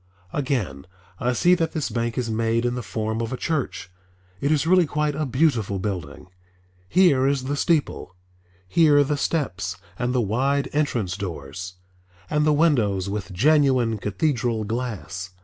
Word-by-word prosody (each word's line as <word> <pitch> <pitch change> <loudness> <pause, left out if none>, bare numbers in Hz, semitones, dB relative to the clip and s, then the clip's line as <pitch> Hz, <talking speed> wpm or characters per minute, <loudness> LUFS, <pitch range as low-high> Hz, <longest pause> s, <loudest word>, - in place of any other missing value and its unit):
Again, 115 - -2 0.3
I 125 +1 +1
see 175 +8 +4
that 165 -3 0
this 155 -4 -2
bank 115 -1 -2
is 120 -3 -1
made 115 +1 0
in 120 - +1
the 125 - -3
form 110 +1 -3
of 115 0 -3
a 130 - -3
church. 110 - -3 0.5
It 140 - 0
is 155 -1 +2
really 180 0 +4
quite 150 0 0
a 155 0 -2
beautiful 120 -7 +1
building. 90 -5 -5 0.6
Here 145 - +4
is 140 -2 0
the 140 +2 -2
steeple, 145 - 0 0.5
here 145 - +5
the 145 +2 -1
steps 100 - -2 0.2
and 125 0 0
the 125 - +1
wide 130 +6 0
entrance 120 -11 0
doors, 90 -1 -6 0.6
and 150 0 +2
the - - +5
windows 115 - +2
with 100 -3 -4
genuine 130 - +3
cathedral 115 +1 -1
glass. 100 -6 -5
120 Hz, 155 wpm, -24 LUFS, 100-145 Hz, 0.6 s, here